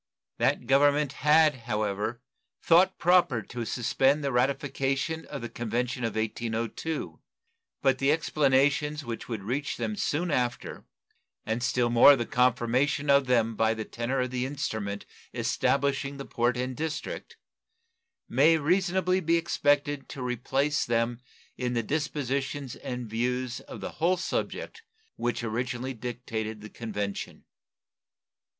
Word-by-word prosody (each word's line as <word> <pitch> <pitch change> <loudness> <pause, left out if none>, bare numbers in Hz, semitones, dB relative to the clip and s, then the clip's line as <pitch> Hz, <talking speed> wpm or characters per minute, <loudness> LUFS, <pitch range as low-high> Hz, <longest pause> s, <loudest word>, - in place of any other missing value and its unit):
That - - +1
Government 145 +2 +3
had, 150 +1 +5
however, 105 +2 -2 0.4
thought 180 +3 +5
proper 170 - +3
to 120 +2 -5
suspend 135 +5 +1
the 140 - 0
ratification 135 +4 0
of 140 -4 -7
the - - -2
convention 120 +2 -2
of 115 -1 -2
1802; 115 - -3 0.6
but 135 -1 +3
the 135 +1 +3
explanations 145 -1 +2
which 115 0 -6
would 110 -4 -4
reach 135 +7 -2
them 215 - -2
soon 170 -2 -1
after, 125 -3 -2 0.6
and 110 +2 -1
still 120 -1 +1
more 120 +4 +8
the 120 -3 -2
confirmation 125 +4 +2
of 140 -1 +4
them 115 -3 +2
by 110 +1 +2
the 110 -1 -4
tenor 125 +3 -2
of 125 0 -2
the 125 -1 -1
instrument 110 -8 -4 0.3
establishing 140 0 0
the 140 - -6
port 120 +1 0
and 125 +1 -2
district, 160 +1 -5 0.9
may 150 +7 +4
reasonably 180 +3 +2
be 170 -1 +2
expected 145 -3 +1
to 130 - -6
replace 135 +4 0
them 115 +1 0 0.4
in 125 -1 -1
the 115 -1 0
dispositions 140 -1 -2
and 125 -2 -5
views 125 +3 -2
of - - -10
the - - -5
whole 180 +3 +3
subject 450 - -3 0.3
which 120 -1 -2
originally 120 +3 -2
dictated 110 -2 -5
the 110 - -9
convention. 105 -3 -5
130 Hz, 130 wpm, -28 LUFS, 120-145 Hz, 0.9 s, more